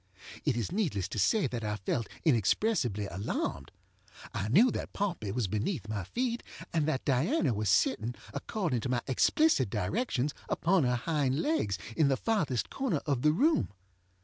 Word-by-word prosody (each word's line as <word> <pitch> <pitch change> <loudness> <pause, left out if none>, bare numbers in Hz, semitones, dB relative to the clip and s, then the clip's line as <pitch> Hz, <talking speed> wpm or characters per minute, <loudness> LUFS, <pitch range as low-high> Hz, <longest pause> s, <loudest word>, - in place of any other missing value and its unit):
It 140 -6 +1
is 115 - -2
needless 160 - 0
to 105 - -3
say 200 - +3
that 120 -3 -3
I 105 0 -1
felt 105 +3 -2 0.2
inexpressibly 120 - +2
alarmed. 90 -7 -3 0.6
I 95 - -2
knew 215 - +5
that - - -5
Pompey 175 - -2
was 115 -1 -1
beneath 110 - -2
my 105 -4 -3
feet, 240 - -2 0.3
and 155 -3 +1
that 135 -4 -1
Diana 145 - +2
was 105 -1 -1
sitting, 110 +5 +2 0.2
according 150 - -2
to 120 - -4
my 120 -2 0
explicit 135 - +3
directions, 140 - -1 0.2
upon 175 -3 +2
her 125 0 +2
hind 140 +1 0
legs, 135 - 0 0.2
in 155 - +4
the 135 -1 +2
farthest 155 - 0
corner 250 - -1
of 140 -5 0
the 150 - +4
room. 295 - +2
130 Hz, 165 wpm, -30 LUFS, -, 0.6 s, knew